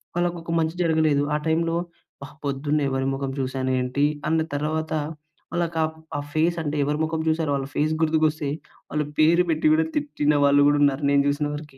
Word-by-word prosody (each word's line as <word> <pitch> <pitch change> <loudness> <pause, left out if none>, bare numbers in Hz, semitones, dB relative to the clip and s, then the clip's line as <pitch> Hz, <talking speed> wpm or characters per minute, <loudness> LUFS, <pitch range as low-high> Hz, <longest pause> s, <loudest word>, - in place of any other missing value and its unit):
వాళ్ళకొక 175 -1 -2
మంచి 160 +1 -1
జరగలేదు 155 -3 +2
ఆ - - +2
టైంలో, 165 +1 +1 0.5
"ఆహ్! 140 - -14
పొద్దున్నే 145 +1 0
ఎవరి 135 0 -1
మొఖం 135 0 -3
చూసాను 130 0 -1
ఏంటి?" 125 +3 0 0.2
అన్న 160 0 +2
తర్వాత 155 +2 -2 0.6
వాళ్ళకి 170 -1 -1 0.4
ఆ - - -1
ఫేస్ 165 +2 +1
అంటే 150 -1 -2
ఎవరి 150 +2 -1
మొఖం 160 0 -1
చూసారో 160 -2 0
వాళ్ళ 135 -1 -3
ఫేస్ 155 +1 +1
గుర్తుకొస్తే 155 -2 +1 0.4
వాళ్ళ 150 - -1 0.2
పేరు 165 +3 +5
పెట్టి 155 -1 +2
కూడా 160 0 +3
తిట్టిన 285 - 0
వాళ్ళు 140 0 +5
కూడా 145 - +3
ఉన్నారు 140 0 +2
నేను 140 0 +4
చూసిన 145 +1 0
వరకి. 145 -2 -10
155 Hz, 175 wpm, -24 LUFS, 140-160 Hz, 0.6 s, పేరు